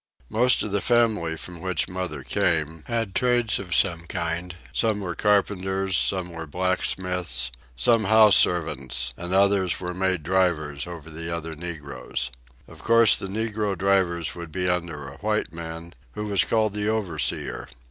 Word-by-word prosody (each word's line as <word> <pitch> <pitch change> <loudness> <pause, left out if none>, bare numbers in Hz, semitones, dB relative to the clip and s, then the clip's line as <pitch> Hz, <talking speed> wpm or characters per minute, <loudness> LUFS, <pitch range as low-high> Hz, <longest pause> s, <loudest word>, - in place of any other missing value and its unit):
Most 125 +3 +3
of 105 - -4
the 100 0 0
family 110 -9 +2
from 85 +1 -8
which 95 -3 -1
mother 90 -7 -4
came, 80 +2 0
had 115 -4 -2
trades 120 -2 +2
of 90 -4 -3
some 85 -3 +1
kind; 85 +2 -3 0.2
some 110 -3 +1
were 90 -3 -3
carpenters, 95 -1 +1
some 90 -1 +1
were 85 -1 -7
blacksmiths, 90 -3 -1 0.2
some 110 - +3
house 110 0 +7
servants, 65 -7 +2
and 90 +1 -6
others 95 -1 +3
were 90 -1 -4
made 95 -3 0
drivers 85 -5 0
over 80 -2 -9
the 80 +1 -6
other 80 -1 -4
negroes. 75 -7 -5 0.4
Of - - -14
course 115 -1 +5
the - - -5
negro 105 -1 -2
drivers 90 -4 +1
would 85 -2 -8
be 90 +2 -2
under 85 -5 -2
a 70 +1 -10
white 105 -2 -1
man, 85 0 -7 0.2
who 105 - -4
was 100 -2 +2
called 110 -2 +1
the 105 0 -1
overseer. 95 - -2
90 Hz, 155 wpm, -25 LUFS, 80-100 Hz, 0.4 s, house